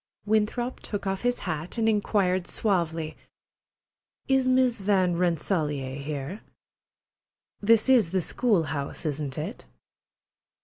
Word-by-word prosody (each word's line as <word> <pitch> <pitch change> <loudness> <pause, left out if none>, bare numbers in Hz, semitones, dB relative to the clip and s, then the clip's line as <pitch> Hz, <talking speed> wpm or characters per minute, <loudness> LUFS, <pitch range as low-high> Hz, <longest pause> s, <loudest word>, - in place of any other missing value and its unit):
Winthrop 220 +4 0
took 205 -1 -5
off 195 0 -1
his 245 0 +1
hat 160 +3 -3
and 225 -1 +2
inquired 200 -4 +1
suavely: 165 -6 -1 1.1
"Is 265 -1 +3
Miss 255 -4 +3
Van 190 -3 +2
Rensselaer 155 -6 0
here? 145 +7 -5 1.2
This 220 +2 +4
is 245 -9 +5
the 190 +2 +1
school 205 0 +1
house, 145 +1 -4
isn't 145 -2 -3
it?" - - -5
190 Hz, 115 wpm, -27 LUFS, 160-220 Hz, 1.2 s, is